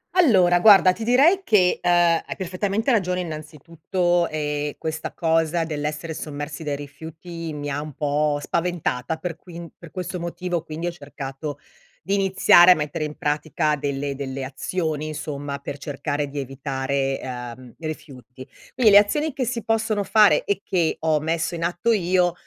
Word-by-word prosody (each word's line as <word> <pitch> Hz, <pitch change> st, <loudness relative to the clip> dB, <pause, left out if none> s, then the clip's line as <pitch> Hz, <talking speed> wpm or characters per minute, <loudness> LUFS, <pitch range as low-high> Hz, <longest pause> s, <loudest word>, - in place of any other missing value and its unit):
Allora, 190 Hz, -, +5 dB
guarda 190 Hz, -2 st, +7 dB
ti 220 Hz, +4 st, -6 dB
direi 280 Hz, -, +5 dB
che, 205 Hz, -, +3 dB
uhm, 175 Hz, -, 0 dB
hai 175 Hz, -1 st, +2 dB
perfettamente 200 Hz, +6 st, -1 dB
ragione 180 Hz, -5 st, +1 dB
innanzitutto 165 Hz, +2 st, -2 dB
e 150 Hz, -1 st, -3 dB
questa 160 Hz, 0 st, -4 dB
cosa 165 Hz, 0 st, +1 dB
dell'essere 155 Hz, +1 st, -4 dB
sommersi 145 Hz, +1 st, -6 dB
dai 145 Hz, -1 st, -2 dB
rifiuti 160 Hz, +3 st, -8 dB
mi 145 Hz, -1 st, -5 dB
ha 140 Hz, +1 st, -2 dB
un 150 Hz, 0 st, -8 dB
po' 150 Hz, +1 st, 0 dB
spaventata, 165 Hz, -6 st, -2 dB
per 170 Hz, 0 st, -5 dB
quin 170 Hz, -1 st, -10 dB
per 170 Hz, -, -12 dB
questo 180 Hz, +1 st, -5 dB
motivo 170 Hz, 0 st, -3 dB
quindi 160 Hz, +2 st, -5 dB
ho 175 Hz, -, -1 dB
cercato 145 Hz, -2 st, -7 dB, 0.4 s
di 195 Hz, -, 0 dB
iniziare 190 Hz, -2 st, +6 dB
a -, -, +10 dB
mettere 150 Hz, 0 st, -3 dB
in 150 Hz, -, -6 dB
pratica 150 Hz, 0 st, 0 dB
delle 140 Hz, 0 st, -2 dB
delle 135 Hz, -1 st, -5 dB
azioni, 155 Hz, +3 st, -3 dB
insomma, 145 Hz, -2 st, -5 dB
per 140 Hz, 0 st, -6 dB
cercare 145 Hz, 0 st, -3 dB
di 140 Hz, +1 st, -6 dB
evitare, 135 Hz, 0 st, -2 dB
uhm, 125 Hz, -1 st, -8 dB
rifiuti. 135 Hz, -5 st, -8 dB, 0.3 s
Quindi 240 Hz, -4 st, +4 dB
le 200 Hz, -, +8 dB
azioni 295 Hz, +10 st, +3 dB
che 265 Hz, -2 st, -2 dB
si 230 Hz, -1 st, -3 dB
possono 220 Hz, -2 st, 0 dB
fare 210 Hz, 0 st, +5 dB
e 200 Hz, 0 st, -1 dB
che 175 Hz, -4 st, 0 dB
ho 155 Hz, -1 st, +1 dB
messo 165 Hz, +2 st, -1 dB
in 165 Hz, -, -4 dB
atto 175 Hz, +7 st, +1 dB
io, 180 Hz, -3 st, +2 dB
160 Hz, 160 wpm, -23 LUFS, 145-180 Hz, 0.4 s, a